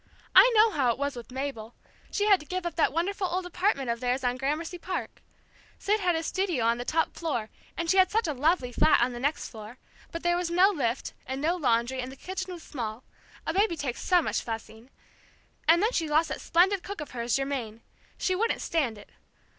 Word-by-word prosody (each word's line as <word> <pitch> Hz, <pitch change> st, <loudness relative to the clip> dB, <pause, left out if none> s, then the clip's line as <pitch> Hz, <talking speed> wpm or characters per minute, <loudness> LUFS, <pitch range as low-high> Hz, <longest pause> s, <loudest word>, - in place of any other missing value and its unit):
I -, -, +8 dB
know 435 Hz, +1 st, +6 dB
how 265 Hz, -9 st, +2 dB
it -, -, -3 dB
was 280 Hz, 0 st, -2 dB
with 240 Hz, -1 st, -9 dB
Mabel; 255 Hz, -4 st, -5 dB, 0.3 s
she 410 Hz, -, 0 dB
had 400 Hz, -3 st, +5 dB
to 300 Hz, -, -12 dB
give 370 Hz, -1 st, -3 dB
up 345 Hz, -, -2 dB
that 325 Hz, -, +3 dB
wonderful 375 Hz, +5 st, -1 dB
old 360 Hz, +1 st, -2 dB
apartment 355 Hz, -, 0 dB
of 235 Hz, -, -3 dB
theirs 250 Hz, +2 st, -1 dB
on 245 Hz, 0 st, +1 dB
Gramercy 305 Hz, +7 st, -3 dB
Park. 365 Hz, +1 st, -5 dB, 0.6 s
Sid 420 Hz, +2 st, +1 dB
had 360 Hz, -3 st, +1 dB
his 325 Hz, 0 st, -2 dB
studio 355 Hz, -12 st, 0 dB
on 230 Hz, +1 st, +2 dB
the 245 Hz, -, -4 dB
top 325 Hz, +3 st, 0 dB
floor, 260 Hz, -10 st, -3 dB, 0.3 s
and 340 Hz, -, -2 dB
she 380 Hz, -, +3 dB
had 375 Hz, 0 st, +6 dB
such 445 Hz, -3 st, +1 dB
a 305 Hz, -, -1 dB
lovely 285 Hz, -1 st, +1 dB
flat 310 Hz, -, +4 dB
on 245 Hz, +1 st, +2 dB
the 240 Hz, -, -6 dB
next 285 Hz, +4 st, -1 dB
floor, 220 Hz, +2 st, -10 dB, 0.3 s
but 335 Hz, -, -6 dB
there 345 Hz, 0 st, +2 dB
was 350 Hz, -1 st, -1 dB
no 360 Hz, +3 st, +5 dB
lift, 270 Hz, -, -2 dB
and 265 Hz, +1 st, -3 dB
no 325 Hz, +5 st, +1 dB
laundry, 250 Hz, -4 st, +1 dB
and 250 Hz, +1 st, -6 dB
the -, -, -10 dB
kitchen 375 Hz, +5 st, -5 dB
was 345 Hz, -2 st, -8 dB
small 230 Hz, -3 st, -5 dB, 0.4 s
a 325 Hz, -, -1 dB
baby 390 Hz, -2 st, +2 dB
takes 275 Hz, -5 st, -3 dB
so 360 Hz, -2 st, +3 dB
much -, -, -1 dB
fussing! 225 Hz, +1 st, -7 dB, 0.8 s
And 340 Hz, +4 st, +5 dB
then 445 Hz, -, +3 dB
she 325 Hz, -9 st, -1 dB
lost 310 Hz, +2 st, +3 dB
that -, -, -4 dB
splendid 370 Hz, +3 st, +3 dB
cook 400 Hz, +1 st, -7 dB
of 295 Hz, -, -7 dB
hers, 235 Hz, -1 st, -1 dB
Germaine. 260 Hz, -5 st, -3 dB, 0.3 s
She 370 Hz, -, 0 dB
wouldn't 455 Hz, +5 st, 0 dB
stand 275 Hz, -10 st, 0 dB
it. 205 Hz, -, -15 dB
310 Hz, 225 wpm, -28 LUFS, 250-360 Hz, 0.8 s, I